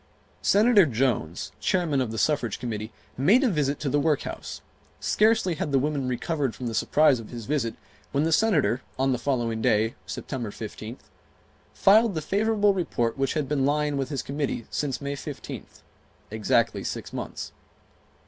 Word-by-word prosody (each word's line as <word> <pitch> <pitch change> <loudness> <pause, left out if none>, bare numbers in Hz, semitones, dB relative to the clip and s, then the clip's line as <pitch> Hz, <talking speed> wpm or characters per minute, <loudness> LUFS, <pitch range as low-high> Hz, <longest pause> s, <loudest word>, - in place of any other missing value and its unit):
Senator 205 -3 +5
Jones, 115 - -1
Chairman 165 -7 +1
of 125 - -1
the 110 - -5
Suffrage 130 -5 +1
Committee, 110 -2 -4 0.3
made 205 - +5
a - - +4
visit 145 -4 0
to 150 - -3
the 145 +2 +2
workhouse. 150 -1 -2 0.4
Scarcely 215 -4 +3
had 150 -2 -3
the 135 - +4
women 140 -1 0
recovered 135 +1 -1
from 125 - -6
the 115 - -2
surprise 145 +3 +3
of 110 - -9
his 120 -3 -7
visit 125 -5 -1 0.4
when 140 +1 +1
the 165 - +1
Senator, 150 - +3 0.2
on 135 0 +2
the 125 - 0
following 120 -5 -1
day, 110 +2 +2
September 125 -6 -4
15th, 110 +3 -8 0.7
filed 215 0 +5
the 155 - -1
favorable 205 +1 +2
report 120 -11 -1
which 135 -1 -1
had 150 -3 0
been 145 -1 0
lying 150 +1 +1
with 135 -1 -2
his 140 -3 -3
Committee 140 -5 -3
since 145 -3 -2
May 140 0 -3
15th, - - -8 0.5
exactly 110 -1 +1
six - - -5
months. - - -5
140 Hz, 165 wpm, -26 LUFS, 120-155 Hz, 0.7 s, Senator